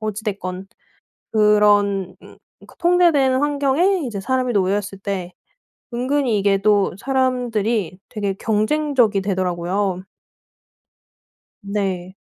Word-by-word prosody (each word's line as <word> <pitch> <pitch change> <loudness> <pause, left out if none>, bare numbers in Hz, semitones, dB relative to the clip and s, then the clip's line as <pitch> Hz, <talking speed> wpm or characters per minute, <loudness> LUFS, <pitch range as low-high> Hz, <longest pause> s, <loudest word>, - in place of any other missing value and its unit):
어찌 215 0 -4
됐건 190 -3 -4 0.7
그런 205 -3 +3
음 - - -15 0.3
그 - - -18
통제된 340 -7 +3
환경에 290 +6 +2
이제 210 -4 -5
사람이 255 +2 0
놓였을 200 0 0
때 190 -3 -4 0.6
은근히 255 -2 0
이게 200 0 +2
또 205 0 +2
사람들이 235 -7 -1
되게 205 -4 -3
경쟁적이 225 0 +1
되더라고요. 185 0 -1 1.6
네. 190 -3 -3
210 Hz, 220 characters per minute, -20 LUFS, 195-255 Hz, 1.6 s, 그런